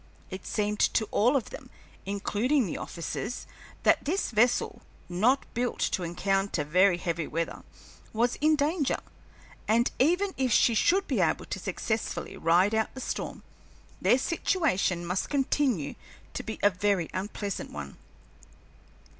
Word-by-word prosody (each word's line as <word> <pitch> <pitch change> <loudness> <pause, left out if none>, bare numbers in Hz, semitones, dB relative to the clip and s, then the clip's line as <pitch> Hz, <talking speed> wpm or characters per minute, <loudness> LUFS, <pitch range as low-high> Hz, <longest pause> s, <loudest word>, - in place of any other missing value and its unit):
It 185 0 -7
seemed 210 -1 -1 0.2
to 220 - +3
all 245 +7 +3
of 260 - -1
them, - - -9 0.4
including 215 +7 +1
the 175 - -4
officers, 205 +7 -5 0.4
that - - +4
this 355 +2 -1
vessel, 235 +2 +2 0.3
not 225 +10 +2
built 245 +1 -1
to - - 0
encounter 195 0 0
very 180 +5 +4
heavy 170 -3 -2
weather, 165 +1 -3 0.5
was 235 +2 +1
in 310 +1 +4
danger, 295 0 +1 0.7
and 230 +3 +3
even 360 +8 +3
if 260 -2 +1
she 230 - +5
should 380 - +3
be - - +1
able - - +1
to - - -5
successfully 220 0 -3
ride 175 +6 +3
out 220 0 +1
the - - -6
storm, - - -4 0.6
their 245 - +5
situation 265 - 0
must 180 +2 -2
continue 265 - +1 0.4
to - - -3
be 220 - -6
a 205 - +6
very 185 -2 +1
unpleasant 200 +1 -4
one. 70 -2 -7
215 Hz, 140 wpm, -28 LUFS, 185-260 Hz, 0.7 s, a